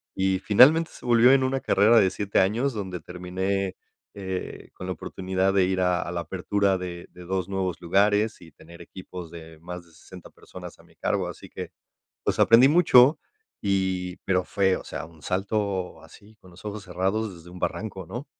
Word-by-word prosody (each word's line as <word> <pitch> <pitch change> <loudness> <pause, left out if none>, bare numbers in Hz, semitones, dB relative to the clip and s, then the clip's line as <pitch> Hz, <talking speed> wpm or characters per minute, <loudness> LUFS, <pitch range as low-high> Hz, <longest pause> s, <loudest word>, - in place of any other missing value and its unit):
Y 95 0 +1
finalmente 135 - +5
se - - -14
volvió 120 +1 +5
en 135 -1 +4
una 130 +1 -1
carrera 110 +4 +4
de 95 -3 +4
7 100 +1 0
años, 115 +8 +1
donde 95 -4 -5
terminé, 95 +2 -3 0.4
eh, 95 -2 -6
con 95 - -8
la 95 - -2
oportunidad 95 +1 -2
de 95 -1 +4
ir 95 0 -1
a 90 -1 +1
a 85 - -5
la 85 -1 -3
apertura 95 +2 0
de 90 -1 -7
de 90 - -13
2 95 0 -2
nuevos 95 -2 -2
lugares 105 +4 +2
y 85 -2 -14
tener 85 +4 -15
equipos 90 -3 -10
de 80 -1 -12
más 90 +1 -8
de 85 - -23
60 90 +3 -14
personas - - -12
a - - -18
mi - - -24
cargo. - - -1
Así - - -11
que, - - -7 0.5
pues, - - -1
aprendí 115 +3 +7
mucho 150 -4 +6 0.4
y 95 -2 -1
pero 95 -1 +1
fue, 95 -2 +1
o - - -10
sea, - - -6
un 80 -1 -17
salto 95 0 -2
así 110 +2 -17
con 90 - -17
los 85 - -16
ojos 105 -1 -5
cerrados 95 +3 -2
desde 85 +1 -14
un 90 - -10
barranco, 95 -3 -4
¿no? 120 - -6
95 Hz, 190 wpm, -25 LUFS, 90-105 Hz, 0.5 s, aprendí